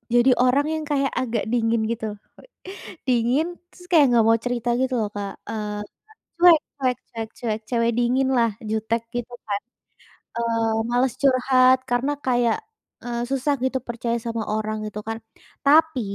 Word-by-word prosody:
jadi 245 +2 +5
orang 275 +4 +3
yang 315 - -3
kayak 275 -1 +2
agak 230 -3 -1
dingin 230 -1 +1
gitu, 230 -1 -3 1.0
dingin 250 +5 +2 0.3
terus 355 - -16
kayak 315 -5 +7
nggak 235 -2 +5
mau 225 0 +4
cerita 245 -1 -1
gitu 260 0 0
loh 210 -2 -1
Kak, 200 -1 -4 0.2
eee, 210 -1 -4 0.6
cuek 345 -2 +8 0.2
cuek 255 -3 0
cuek 225 -1 -6
cuek, 220 -2 -2
cewe 230 -2 +1
dingin 255 +2 +2
lah 230 -2 +3 0.2
jutek 220 +1 -1
gitu 245 0 -4 0.2
kan, 200 -1 -1 0.8
eee, 230 -1 0 0.2
males 245 0 +2
curhat 255 -1 +5
karena 245 +4 +1
kayak, 245 - +2 0.5
eee, 240 -1 -3
susah 270 +2 +1
gitu 260 0 0
percaya 235 0 -2
sama 230 -1 -2
orang 215 0 -2
gitu 210 0 -6
kan. 225 0 -3 0.5
Tapi 310 -2 +5
240 Hz, 150 wpm, -23 LUFS, 225-260 Hz, 1.0 s, cuek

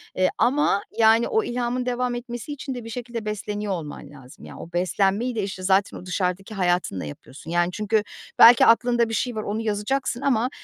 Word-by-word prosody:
eee, 185 0 +2
ama, 245 -3 +2 0.2
yani, 225 +1 +5
o 440 0 +1
ilhamın 245 -1 -2
devam 250 0 -1
etmesi 240 +3 -6
için 275 -1 -6
de 245 - -6
bir 230 - -9
şekilde 235 -1 -6
besleniyor 210 -1 -3
olman 150 -4 -7
lazım. 135 -3 -14
Ya, - - -11
o 170 - -10
beslenmeyi 195 +7 0
de, 215 - -1
işte, 190 -1 -6
zaten 195 +1 +2
o - - -11
dışarıdaki 185 +2 -2
hayatınla 175 - 0
yapıyorsun. 130 - -10
Yani, 175 +1 +1
çünkü 210 +2 0 0.4
belki 235 +1 +9
aklında 235 0 +3
bir - - -4
şey 245 +1 -1
var, 215 - -3
onu 210 +2 -3
yazacaksın 225 +4 -2
ama 250 -3 +1
215 Hz, 190 wpm, -24 LUFS, 185-240 Hz, 0.4 s, belki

